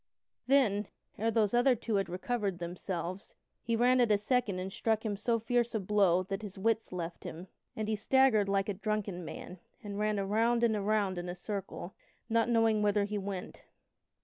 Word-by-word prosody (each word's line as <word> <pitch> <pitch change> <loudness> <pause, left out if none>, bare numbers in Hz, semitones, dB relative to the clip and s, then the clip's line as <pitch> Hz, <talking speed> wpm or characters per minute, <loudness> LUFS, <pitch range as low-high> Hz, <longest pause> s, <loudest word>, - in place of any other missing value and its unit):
Then, 220 -7 +3 0.3
ere 225 +2 +1
those 220 -2 +2
other 245 +2 +4
two 220 -2 -1
had 195 - -1
recovered 195 +1 -2
themselves, 175 +2 -5 0.3
he 230 -1 -1
ran 250 +2 +4
at 240 - +3
a 210 - +5
second 215 -2 0
and 190 +1 -4
struck 220 0 0
him 210 -2 -1
so 230 +3 0
fierce 235 +1 0
a - - +2
blow 190 -2 +3
that 195 +2 -4
his 205 -3 -8
wits 225 +3 0
left 175 -2 -5
him, 170 +3 -7 0.3
and 215 -1 -3
he 220 - +1
staggered 220 -2 +3
like 195 -1 +1
a 205 - -1
drunken 200 -2 -3
man 180 +2 -8 0.2
and 205 -1 -5
ran 210 -1 +1
around 225 +4 +2
and 225 -2 +3
around 205 -3 0
in 175 0 -5
a 175 - -4
circle, 195 -1 -5 0.4
not 230 +1 +2
knowing 225 -2 +3
whither 205 0 +2
he 205 +1 -2
went. 195 -2 -6
210 Hz, 190 wpm, -31 LUFS, 195-225 Hz, 0.4 s, a